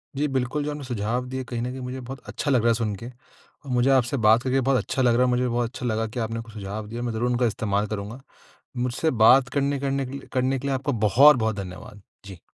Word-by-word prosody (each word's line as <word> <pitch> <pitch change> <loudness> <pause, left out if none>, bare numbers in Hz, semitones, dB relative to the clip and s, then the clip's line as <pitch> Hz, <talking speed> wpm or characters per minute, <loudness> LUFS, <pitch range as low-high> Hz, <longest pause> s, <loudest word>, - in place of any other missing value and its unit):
जी, 145 +2 0
बिल्कुल। 135 +2 -1
जो 150 - -3
आपने 145 -1 -6
सुझाव 120 0 -2
दिए 130 0 -4
कहीं 120 -1 -5
न 125 - -2
कहीं 130 - -7
मुझे 125 +1 -5
बहुत 130 +2 -8
अच्छा 145 - -2
लग 125 -3 +3
रहा 120 - +3
है - - +4
सुन 115 -2 -1
के। 115 +5 -8 0.6
मुझे 125 +1 +2
आपसे 130 0 +2
बात 110 +2 +6
करके 135 +1 +1
बहुत 135 +1 +2
अच्छा 130 - -2
लग 120 -2 +4
रहा 125 - +3
है, - - +1
मुझे 125 0 +1
भी 125 - 0
बहुत 120 -1 0
अच्छा 125 - -7
लगा 110 -1 0
कि 115 +3 -6
आपने 115 0 -3
कुछ 115 -1 -13
सुझाव 105 +1 -6
दिए। 115 +2 -6
मैं 120 -1 -2
ज़रूर 120 +2 -1
उनका 120 0 +1
इस्तेमाल 105 -2 -1
करूँगा। 105 +4 -6 0.6
मुझसे 125 +6 0
बात 130 +1 +6
करने 140 +1 0
करने 135 0 -1
के 130 - -8
लिए 140 0 -8
करने 130 +1 +1
के 140 - -5
लिए 140 - 0
आपका 140 +3 -2 0.2
बहुत-बहुत 120 -1 +5
धन्यवाद। 100 +1 -8 0.2
जी। 95 -3 -10
125 Hz, 260 wpm, -24 LUFS, 110-135 Hz, 0.6 s, बात